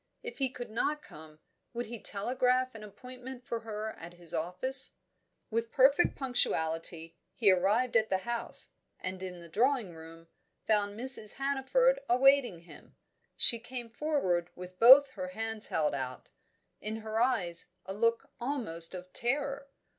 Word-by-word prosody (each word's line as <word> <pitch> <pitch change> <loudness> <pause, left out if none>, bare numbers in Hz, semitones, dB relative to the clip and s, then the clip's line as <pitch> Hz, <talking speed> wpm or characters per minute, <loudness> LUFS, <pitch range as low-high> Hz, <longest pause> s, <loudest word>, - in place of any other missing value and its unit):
If 470 -8 -8
he 265 -1 +2
could 245 -3 -8
not 300 +7 -1
come, 155 0 -14 0.3
would 240 +1 -2
he 235 0 -8
telegraph 255 +5 0
an 220 -1 -10
appointment 250 +4 -10
for 235 - -3
her 220 -1 -5
at 170 +1 -10
his 175 -2 -5
office? 185 +11 +1 0.6
With 230 +1 -2
perfect 275 +5 +4
punctuality, 165 - -1 0.2
he 210 -5 +5
arrived 210 +7 +1
at 220 -1 +3
the 190 - +2
house, 235 +4 -1 0.3
and 185 0 -4
in 180 -2 -7
the 170 - -11
drawing 230 - 0
room 165 +1 -13 0.4
found 210 -1 +1
Mrs. 255 -4 +4
Hannaford 280 - +1
awaiting 255 -7 +4
him. 170 - -16 0.4
She 235 - +4
came 240 -1 -8
forward 205 - -1
with 180 0 -10
both 265 +4 +9
her 185 -6 -6
hands 220 +3 -2
held 150 -2 0
out; 130 -2 -5 0.5
in 220 +1 -5
her 220 0 -3
eyes 185 -11 0 0.2
a 190 - -5
look 230 +2 0
almost 220 - -1
of 180 0 -10
terror. 275 +2 -2
225 Hz, 150 wpm, -31 LUFS, 180-255 Hz, 0.6 s, both